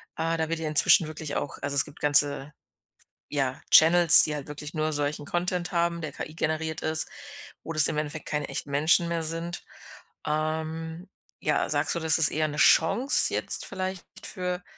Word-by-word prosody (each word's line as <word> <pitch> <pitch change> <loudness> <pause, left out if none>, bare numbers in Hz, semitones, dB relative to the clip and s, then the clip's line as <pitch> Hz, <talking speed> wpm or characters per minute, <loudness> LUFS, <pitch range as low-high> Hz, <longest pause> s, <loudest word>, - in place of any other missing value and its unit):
Ah, 165 +1 -3
da 160 -1 -3
wird 165 0 -3
ja 160 - -4
inzwischen 155 +2 +5
wirklich 155 -1 -7
auch 145 - -5
also, 145 0 -4
es 140 - +5
gibt - - -16
ganze, 145 -1 +3 0.8
ja, 135 -3 -3
Channels, 165 0 +8
die 150 - -1
halt 145 -2 -8
wirklich 150 +1 -8
nur 155 -1 -3
solchen 145 0 -4
Content 175 +2 -3
haben, 170 -1 -2
der 155 -2 -6
KI-generiert 160 0 -5
ist, 155 0 -3 0.5
wo 165 - -7
das 155 -1 +4
im - - -4
Endeffekt 150 +1 -6
keine 150 -1 -4
echten - - -4
Menschen 155 +4 +2
mehr 170 -1 -3
sind. 165 +2 -5 0.6
Ähm, 160 +3 -5 0.3
ja, - - -2
sagst - - -1
du, - - -3
das 160 -1 +3
ist 160 - +5
eher 155 0 -1
'ne 150 0 -8
Chance 210 - +3
jetzt - - +1
vielleicht 190 -1 -6 0.2
für, 180 -2 -5
160 Hz, 180 wpm, -25 LUFS, 150-170 Hz, 0.8 s, Channels